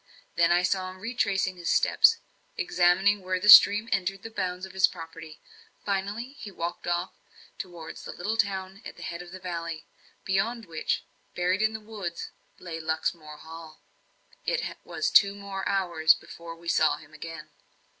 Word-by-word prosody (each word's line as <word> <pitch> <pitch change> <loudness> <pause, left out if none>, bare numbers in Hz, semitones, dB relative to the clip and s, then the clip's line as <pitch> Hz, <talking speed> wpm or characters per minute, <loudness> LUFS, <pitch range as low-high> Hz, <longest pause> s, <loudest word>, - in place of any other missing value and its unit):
Then 170 0 +4
I 175 +1 +4
saw 185 +1 0
him 185 - -11
retracing 195 -4 -1
his 170 -1 -3
steps, 450 +1 +5 0.4
examining 195 - +3
where 185 0 -1
the 205 +3 +1
stream 205 +1 +9
entered 190 +1 -1
the 225 - -7
bounds 185 -3 -3
of 190 - -13
his 190 0 +5
property. 165 -1 -10 0.5
Finally, 205 +5 -2
he 210 - -7
walked 175 -2 -5
off 175 +1 -1 0.5
towards 175 -4 -8
the - - -7
little 205 +6 -3
town 195 -2 -1
at - - -9
the - - -9
head 170 +1 -5
of 175 -1 -11
the 185 - -8
valley 170 -3 -5 0.4
beyond 220 +5 0
which, 165 -3 -2 0.3
buried 180 +3 +1
in 215 0 0
woods, 200 -6 -6 0.3
lay 165 -2 -7
Luxmore 160 -1 -3
Hall. 160 0 -11 0.6
It - - -2
was 460 +3 -2
two 200 0 +6 0.3
hours 175 -5 +3
more - - -13
before 170 0 -10
we 170 +1 -15
saw 155 -3 +3
him 155 0 -17
again. 155 0 -9
185 Hz, 165 wpm, -27 LUFS, 165-200 Hz, 0.6 s, stream